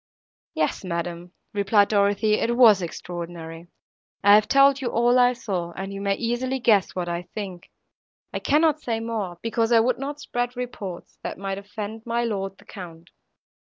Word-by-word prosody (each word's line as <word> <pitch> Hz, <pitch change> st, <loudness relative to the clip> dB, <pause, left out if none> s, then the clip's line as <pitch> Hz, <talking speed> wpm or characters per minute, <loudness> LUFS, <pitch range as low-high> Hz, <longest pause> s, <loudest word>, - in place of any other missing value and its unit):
"Yes, -, -, -1 dB
madam," 175 Hz, 0 st, -4 dB, 0.2 s
replied 205 Hz, 0 st, +3 dB
Dorothée, 205 Hz, +1 st, +2 dB
"it 235 Hz, +1 st, 0 dB
was 220 Hz, -6 st, +7 dB
extraordinary; 170 Hz, -1 st, -7 dB, 0.6 s
I 205 Hz, 0 st, +7 dB
have 210 Hz, 0 st, +6 dB
told 275 Hz, 0 st, +5 dB
you 255 Hz, -, -2 dB
all 240 Hz, +2 st, +3 dB
I 245 Hz, 0 st, +5 dB
saw, 185 Hz, -8 st, -4 dB
and 195 Hz, +2 st, -6 dB
you 195 Hz, -, -6 dB
may 200 Hz, 0 st, +1 dB
easily 240 Hz, +4 st, -1 dB
guess 215 Hz, -5 st, +3 dB
what 180 Hz, -1 st, -2 dB
I 170 Hz, 0 st, -2 dB
think, 190 Hz, -5 st, -6 dB, 0.6 s
I -, -, -2 dB
cannot 310 Hz, 0 st, +2 dB
say 230 Hz, -5 st, -2 dB
more, 220 Hz, -6 st, -4 dB
because 230 Hz, 0 st, 0 dB
I 230 Hz, -, +6 dB
would 245 Hz, +2 st, +1 dB
not 285 Hz, +2 st, -5 dB
spread 245 Hz, -3 st, -3 dB
reports, 205 Hz, -8 st, -7 dB
that -, -, -5 dB
might 195 Hz, +1 st, -4 dB
offend 210 Hz, +2 st, -7 dB
my 235 Hz, 0 st, 0 dB
lord 195 Hz, -4 st, -3 dB
the 200 Hz, -, -19 dB
Count." 175 Hz, -5 st, -11 dB
210 Hz, 170 wpm, -24 LUFS, 185-240 Hz, 0.6 s, was